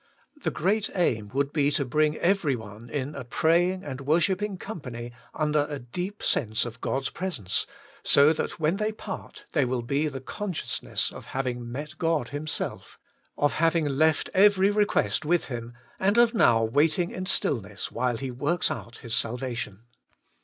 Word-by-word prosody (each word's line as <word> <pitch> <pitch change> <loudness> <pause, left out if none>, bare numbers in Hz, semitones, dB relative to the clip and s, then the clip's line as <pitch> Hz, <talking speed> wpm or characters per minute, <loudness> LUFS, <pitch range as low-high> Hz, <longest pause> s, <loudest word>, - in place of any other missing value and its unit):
The - - 0
great 205 +5 +1
aim 115 - +1
would 140 +2 0
be 145 -2 +3
to 140 - +1
bring 150 +4 +2
every 175 -6 +2
one 110 +1 -10
in 140 +3 -3
a 140 - -6
praying 175 +8 +2
and 135 -1 -6
worshipping 185 +7 +1
company 125 - -6 0.2
under 150 -1 +1
a 145 - -3
deep 180 - -5
sense 110 -2 +1
of 120 0 -8
God's 135 0 -1
presence, 165 - -2 0.3
so 145 +3 +6
that 160 - -3
when 160 +4 +2
they 215 +1 0
part 210 -2 -8
there 145 -5 +2
will 125 -1 -1
be 140 +5 +1
the 135 -3 -4
consciousness 185 +6 -3
of - - -10
having 120 -3 -2
met 150 +6 -6
God 165 -7 +1
Himself, 145 +1 -4 0.4
of 145 - +2
having 165 0 +2
left 150 +2 +2
every 200 0 +5
request 205 - +2
with 170 +1 +1
Him, 120 -1 -5 0.3
and 200 +4 +2
of 240 -1 +6
now 115 - +5
waiting 155 - +2
in 185 0 -5
stillness 105 - -1
while 125 -1 0
He 135 0 -4
works 145 +8 0
out 120 0 -6
His 115 -1 -1
salvation. 115 -3 -3
145 Hz, 165 wpm, -27 LUFS, 120-175 Hz, 0.4 s, so